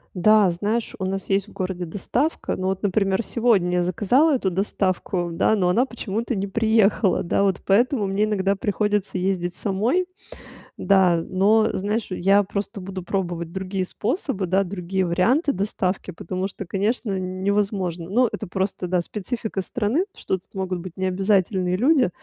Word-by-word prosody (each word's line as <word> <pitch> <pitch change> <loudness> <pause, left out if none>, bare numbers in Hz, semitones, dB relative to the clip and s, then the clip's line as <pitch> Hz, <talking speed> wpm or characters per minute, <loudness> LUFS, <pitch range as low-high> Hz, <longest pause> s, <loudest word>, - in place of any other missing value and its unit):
Да, 205 +1 +5
знаешь, 210 +7 -2
у 190 - -2
нас 195 +1 -4
есть 195 +1 +1
в - - -14
городе 185 -2 -3
доставка, 205 - -1
но 185 - -3
вот, 190 0 -2
например, 195 +1 +1
сегодня 195 -8 +2
я - - +2
заказала 225 - +3
эту 200 -7 0
доставку, 185 -1 -1
да, 220 +6 +2
но 180 -3 +2
она 245 +8 +3
почему-то 230 -1 -3
не 195 +1 -1
приехала. 220 -2 +2
Да, 175 - +1
вот 195 -2 0
поэтому 225 +2 +3
мне 195 +2 +1
иногда 200 -2 +1
приходится 205 0 -1
ездить 180 -1 -1
самой. 225 - 0 0.7
Да, 180 -4 +3
но 215 +4 +3
знаешь, 210 +3 -1
я 195 +3 +3
просто 200 0 -4
буду 185 0 -6
пробовать 175 -3 -3
другие 190 0 -2
способы, 215 - -2
да, 190 +3 +1
другие 185 0 -2
варианты 230 - +2
доставки. 190 -1 -2
Потому 185 +3 -4
что, 195 - -8
конечно, 200 +2 -1
невозможно 185 -2 -1
но 245 +5 +3
это - - -5
просто, 190 0 -2
да, 180 0 +1
специфика 210 +2 -4
страны, 245 - 0
что 190 - -2
тут 180 - -24
могут 190 -2 -3
быть 175 0 -8
необязательные 190 -1 +1
люди. 260 - +4
195 Hz, 160 wpm, -23 LUFS, 185-215 Hz, 0.7 s, Да